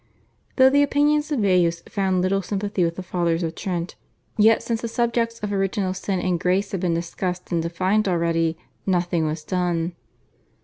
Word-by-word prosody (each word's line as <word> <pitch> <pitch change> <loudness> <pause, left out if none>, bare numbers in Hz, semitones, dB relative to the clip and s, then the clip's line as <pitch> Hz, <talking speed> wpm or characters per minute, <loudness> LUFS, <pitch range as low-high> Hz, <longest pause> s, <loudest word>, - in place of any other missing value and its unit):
Though 260 0 +6
the 285 +1 +4
opinions 295 +2 +2
of 275 -6 +1
Baius 175 -3 +2
found 190 -2 0
little 195 +1 +1
sympathy 200 0 -2
with 165 0 0
the 185 - -6
Fathers 170 -1 0
of 165 -1 -2
Trent, 175 -2 -3 0.4
yet 220 +1 +4
since 230 -1 -2
the 235 - -2
subjects 230 0 0
of 210 -1 -3
Original 195 -1 0
Sin 190 0 -2
and 180 -1 0
Grace 190 +4 0
had 195 - -2
been 175 -3 +1
discussed 180 +2 -4
and 170 -1 +1
defined 185 +5 0
already, 165 -2 +1 0.3
nothing 175 -3 +1
was 155 0 -4
done. 175 -1 -1
185 Hz, 175 wpm, -23 LUFS, 170-210 Hz, 0.4 s, Though